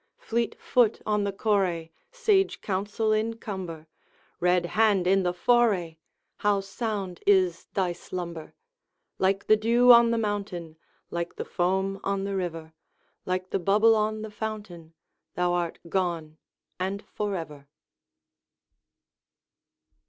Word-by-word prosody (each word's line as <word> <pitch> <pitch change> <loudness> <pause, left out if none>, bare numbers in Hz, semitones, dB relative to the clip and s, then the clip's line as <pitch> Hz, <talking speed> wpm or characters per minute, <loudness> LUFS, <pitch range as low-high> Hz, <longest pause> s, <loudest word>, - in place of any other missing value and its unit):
Fleet 235 0 -2
foot 240 -4 +2
on 210 -1 +1
the 200 - -1
correi, 190 -6 0 0.2
Sage 430 -6 +2
counsel 210 +3 -1
in 220 +1 0
cumber, 180 -8 -6 0.5
Red 180 0 +2
hand 210 -4 +3
in 195 +1 +4
the 180 -1 +1
foray, 195 -5 +2 0.4
How 205 -1 +2
sound 195 -2 -4
is 185 -4 +3
thy 185 -3 +1
slumber! 170 -3 -7 0.6
Like 195 +1 +1
the 215 - +6
dew 235 +3 +5
on 235 -1 +8
the 230 - +1
mountain, 200 -7 -3 0.4
Like 170 0 -3
the - - -5
foam 190 +2 0
on 195 0 -1
the 200 0 -2
river, 165 -4 -4 0.5
Like 185 0 -2
the - - 0
bubble 210 +5 +4
on 215 0 -1
the 220 - -7
fountain, 205 -7 -7 0.4
Thou 180 0 +1
art 175 -1 -1
gone, 170 -4 -2 0.4
and 195 +2 -2
forever! 165 -9 -5
195 Hz, 125 wpm, -27 LUFS, 175-215 Hz, 0.6 s, on